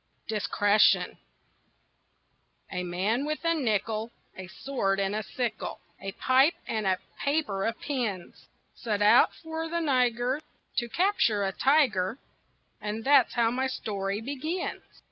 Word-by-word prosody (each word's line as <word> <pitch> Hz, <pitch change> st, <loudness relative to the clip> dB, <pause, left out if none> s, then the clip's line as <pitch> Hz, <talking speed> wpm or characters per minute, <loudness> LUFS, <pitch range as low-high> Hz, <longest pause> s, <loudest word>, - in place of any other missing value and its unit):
DISCRETION 210 Hz, -1 st, +2 dB, 1.5 s
A 180 Hz, -, -2 dB
man 190 Hz, +8 st, -1 dB
with 305 Hz, +3 st, -3 dB
a 330 Hz, -, +4 dB
nickel, 225 Hz, -5 st, -1 dB, 0.3 s
A 185 Hz, -1 st, -8 dB
sword, 195 Hz, -3 st, -2 dB
and 195 Hz, +1 st, 0 dB
a 215 Hz, -, -1 dB
sickle, 225 Hz, +1 st, -4 dB, 0.2 s
A 195 Hz, 0 st, -5 dB
pipe, 265 Hz, -, +3 dB
and 215 Hz, -3 st, -1 dB
a 185 Hz, -1 st, +2 dB, 0.2 s
paper 280 Hz, -10 st, 0 dB
of 230 Hz, 0 st, -3 dB
pins 225 Hz, -11 st, -4 dB, 0.3 s
Set 210 Hz, -3 st, -2 dB
out 210 Hz, -, +6 dB
for 320 Hz, 0 st, -5 dB
the 340 Hz, +1 st, -1 dB
Niger 255 Hz, -2 st, +1 dB, 0.4 s
To 240 Hz, -1 st, 0 dB
capture 340 Hz, -, +2 dB
a 195 Hz, -, 0 dB
tiger 245 Hz, -6 st, +2 dB, 0.6 s
And 210 Hz, +1 st, -4 dB
that's 275 Hz, -3 st, +5 dB
how 230 Hz, -1 st, +3 dB
my 260 Hz, +2 st, 0 dB
story 200 Hz, -5 st, -3 dB
begins. 295 Hz, +8 st, -3 dB
230 Hz, 130 wpm, -28 LUFS, 205-275 Hz, 1.5 s, out